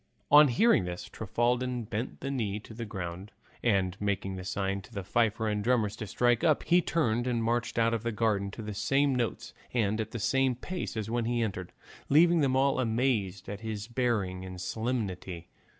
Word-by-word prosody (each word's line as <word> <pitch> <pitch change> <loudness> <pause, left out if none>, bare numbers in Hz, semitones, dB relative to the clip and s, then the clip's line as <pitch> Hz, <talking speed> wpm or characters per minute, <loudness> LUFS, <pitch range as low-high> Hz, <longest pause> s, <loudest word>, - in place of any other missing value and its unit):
On 150 +1 +9
hearing 135 - +4
this 90 0 -5
Trifaldin 120 +3 -1
bent 110 +3 -5
the 135 - -3
knee 105 -6 -2
to 110 - -12
the 115 0 -6
ground, 95 +1 -6 0.3
and 95 -5 +1
making 95 -2 -2
a - - -6
sign 95 +1 -2
to 110 - -16
the 100 -4 -5
fifer 110 +2 +1
and 105 -1 -1
drummers 110 -3 +1
to 110 - -5
strike 120 +2 +2
up, 155 -3 +3
he 175 +1 +4
turned 120 -8 0
and 120 -2 0
marched 120 +1 -1
out 115 0 +3
of 115 - -1
the 115 +1 -2
garden 105 -2 0
to 110 +3 -8
the 105 0 -5
same 135 +6 +2
notes 120 -3 -2 0.2
and 110 -2 +1
at 110 - -4
the 120 - -5
same 130 +3 +2
pace 180 0 -5
as 110 0 -3
when 120 -1 0
he 120 0 +1
entered, 95 -5 -4 0.4
leaving 170 +3 +5
them 135 -2 +2
all 135 0 +3
amazed 110 -6 0
at 100 0 -5
his 110 -2 -4
bearing 115 -7 -1
and 90 -1 -8
solemnity. 95 -5 -3
115 Hz, 200 wpm, -29 LUFS, 100-125 Hz, 0.4 s, On